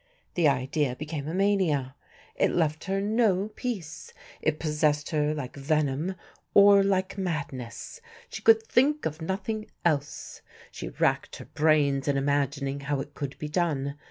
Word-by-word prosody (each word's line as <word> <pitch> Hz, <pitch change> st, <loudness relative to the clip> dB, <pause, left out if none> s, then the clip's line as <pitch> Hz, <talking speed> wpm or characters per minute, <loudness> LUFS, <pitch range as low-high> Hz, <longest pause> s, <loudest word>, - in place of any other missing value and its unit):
The 170 Hz, -3 st, +3 dB
idea 135 Hz, 0 st, 0 dB
became 150 Hz, 0 st, -5 dB
a 160 Hz, -, -3 dB
mania. 185 Hz, -10 st, +1 dB, 0.4 s
It -, -, +2 dB
left 160 Hz, -2 st, 0 dB
her 195 Hz, +1 st, 0 dB
no 205 Hz, -1 st, +2 dB
peace. 210 Hz, -, -6 dB, 0.3 s
It 155 Hz, -1 st, +1 dB
possessed 150 Hz, -1 st, 0 dB
her 150 Hz, -1 st, +1 dB
like 140 Hz, -4 st, -6 dB
venom 150 Hz, +4 st, 0 dB, 0.4 s
or 200 Hz, 0 st, +8 dB
like 195 Hz, 0 st, 0 dB
madness. 150 Hz, -, -5 dB, 0.3 s
She -, -, -7 dB
could 450 Hz, 0 st, +6 dB
think 295 Hz, -, +2 dB
of 155 Hz, +1 st, -3 dB
nothing 210 Hz, +5 st, -3 dB, 0.2 s
else. 145 Hz, -4 st, -1 dB, 0.3 s
She -, -, -6 dB
racked -, -, 0 dB
her -, -, -9 dB
brains 145 Hz, -3 st, +2 dB
in 140 Hz, -1 st, +2 dB
imagining 140 Hz, 0 st, 0 dB
how 140 Hz, 0 st, -2 dB
it 145 Hz, +2 st, -6 dB
could 140 Hz, -2 st, -5 dB
be 150 Hz, -, -5 dB
done. 150 Hz, -4 st, -1 dB
155 Hz, 150 wpm, -27 LUFS, 140-195 Hz, 0.4 s, or